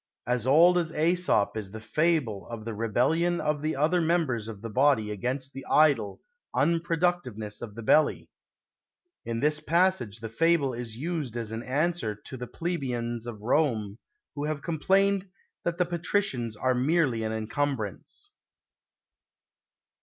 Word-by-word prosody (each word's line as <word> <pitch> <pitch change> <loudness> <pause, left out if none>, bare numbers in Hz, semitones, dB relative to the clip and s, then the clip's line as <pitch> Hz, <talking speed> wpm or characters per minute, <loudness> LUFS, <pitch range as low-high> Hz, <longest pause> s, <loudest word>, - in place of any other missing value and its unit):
As 125 0 0
old 170 +6 +6
as 165 -2 -2
Aesop 165 - +2
is 105 -3 -4
the 110 +3 -8
fable 125 - 0
of 115 -2 -7
the 115 - -4
rebellion 140 +11 +1
of 150 -1 -1
the 155 +1 -1
other 160 +6 +2
members 160 -10 0
of 110 -2 -8
the 115 - -4
body 125 -4 +3
against 130 +6 -3
the 135 - -7
idle 145 -10 +3 0.3
unproductiveness 165 - 0
of 110 -4 -7
the 115 - -7
belly. 155 +7 +3 1.0
In 115 0 -3
this 150 +1 +2
passage 165 - +1
the 115 - -5
fable 140 +3 +2
is 115 -2 -6
used 150 -5 -3
as 115 -2 -4
an 115 +1 -4
answer 140 -2 -1
to 105 +5 -10
the 125 -1 -6
plebeians 120 -9 -3
of 110 -3 -7
Rome 115 -5 0 0.3
who 145 0 -3
have 150 -2 -3
complained 195 +4 +1 0.4
that 170 0 -1
the 180 - +2
patricians 170 - -1
are 130 +3 +1
merely 130 -2 +1
an 110 0 -2
encumbrance. 115 - -3
135 Hz, 145 wpm, -27 LUFS, 115-165 Hz, 1.0 s, old